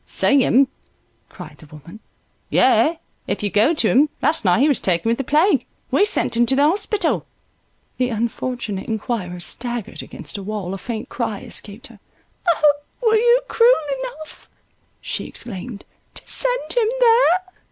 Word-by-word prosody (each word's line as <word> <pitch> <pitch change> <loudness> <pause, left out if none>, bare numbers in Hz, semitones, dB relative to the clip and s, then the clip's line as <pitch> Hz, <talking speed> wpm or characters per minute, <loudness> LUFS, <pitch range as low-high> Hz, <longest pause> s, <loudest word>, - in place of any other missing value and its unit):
"See 280 -1 +2
him," 270 +3 +4 0.6
cried 155 -5 -11
the 155 - -16
woman, 155 +7 -13 0.5
"yes, 325 +2 +3 0.3
if - - -3
you 205 - -1
go 225 +11 +3
to 235 - +2
him; 285 +6 +4
last 315 - 0
night 190 +4 +3
he 290 - +5
was 285 - +2
taken 180 +3 0
with 235 - 0
the - - -1
plague, 305 +3 +3
and - - -30 0.3
we 405 - +4
sent 420 - +1
him 240 0 +3
to 265 - +2
the 280 - +3
hospital." 390 +3 +1 0.8
The 250 -1 +1
unfortunate 230 -2 -3
inquirer 210 -5 -3
staggered 235 +7 -5
against - - -7
a - - -7
wall, 195 -2 -5
a 195 - -6
faint 225 0 -6
cry 225 -4 -3
escaped 205 +3 -6
her 230 -3 -14 0.5
—"O! 300 -3 +4 0.3
were 445 -1 +4
you 480 +3 +4
cruel 485 +2 +4 0.2
enough," - - -9 0.5
she - - -4
exclaimed, 215 -1 -6 0.3
"to - - -6
send - - +1
him 475 -3 +2
there?" 460 -7 +5
245 Hz, 165 wpm, -20 LUFS, 210-325 Hz, 0.8 s, he